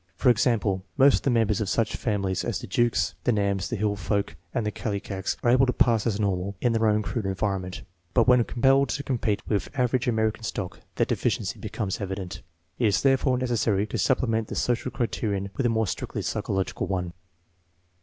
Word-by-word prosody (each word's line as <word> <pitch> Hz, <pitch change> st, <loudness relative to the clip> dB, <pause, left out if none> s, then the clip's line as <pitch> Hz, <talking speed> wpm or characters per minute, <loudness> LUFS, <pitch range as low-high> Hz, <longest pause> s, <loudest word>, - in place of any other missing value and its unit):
For 125 Hz, -, +4 dB
example, 105 Hz, -5 st, +1 dB
most 140 Hz, 0 st, +6 dB
of -, -, -5 dB
the -, -, 0 dB
members 115 Hz, -3 st, +2 dB
of 100 Hz, -, -1 dB
such 115 Hz, -1 st, 0 dB
families 100 Hz, -4 st, -1 dB
as -, -, -1 dB
the -, -, -7 dB
Jukes, 120 Hz, -1 st, +1 dB
the -, -, +3 dB
Nams, 100 Hz, -3 st, 0 dB
the -, -, -2 dB
Hill 105 Hz, -1 st, 0 dB
Folk, 100 Hz, +1 st, -2 dB, 0.2 s
and 120 Hz, -4 st, -1 dB
the 105 Hz, -, 0 dB
Kallikaks 100 Hz, -2 st, -3 dB
are 120 Hz, -, +4 dB
able 130 Hz, +2 st, +5 dB
to 125 Hz, -, +1 dB
pass 115 Hz, -2 st, +3 dB
as 105 Hz, -2 st, 0 dB
normal 100 Hz, -1 st, -1 dB
in 120 Hz, -2 st, +1 dB
their 115 Hz, -1 st, +2 dB
own 105 Hz, 0 st, +2 dB
crude 110 Hz, -1 st, -3 dB
environment, 95 Hz, -1 st, -2 dB, 0.3 s
but -, -, +4 dB
when 125 Hz, -2 st, +6 dB
compelled 135 Hz, +3 st, +3 dB
to 140 Hz, -, -2 dB
compete 115 Hz, -6 st, -1 dB
with 105 Hz, -2 st, -1 dB
average 125 Hz, 0 st, +1 dB
American 110 Hz, -1 st, +1 dB
stock 100 Hz, -4 st, -4 dB, 0.2 s
their -, -, +2 dB
deficiency -, -, -1 dB
becomes 100 Hz, -1 st, -3 dB
evident. 95 Hz, -2 st, -5 dB, 0.4 s
It 120 Hz, -, +3 dB
is 100 Hz, -, +1 dB
therefore 135 Hz, -1 st, +3 dB
necessary 115 Hz, -5 st, +1 dB
to 110 Hz, -, -4 dB
supplement 115 Hz, -4 st, +1 dB
the -, -, -6 dB
social 120 Hz, +1 st, 0 dB
criterion 105 Hz, -6 st, -2 dB
with 135 Hz, -, +1 dB
a -, -, +1 dB
more 110 Hz, -1 st, +1 dB
strictly 90 Hz, -, -4 dB
psychological 95 Hz, -1 st, -2 dB
one. 90 Hz, -2 st, -2 dB
110 Hz, 195 wpm, -26 LUFS, 100-120 Hz, 0.4 s, most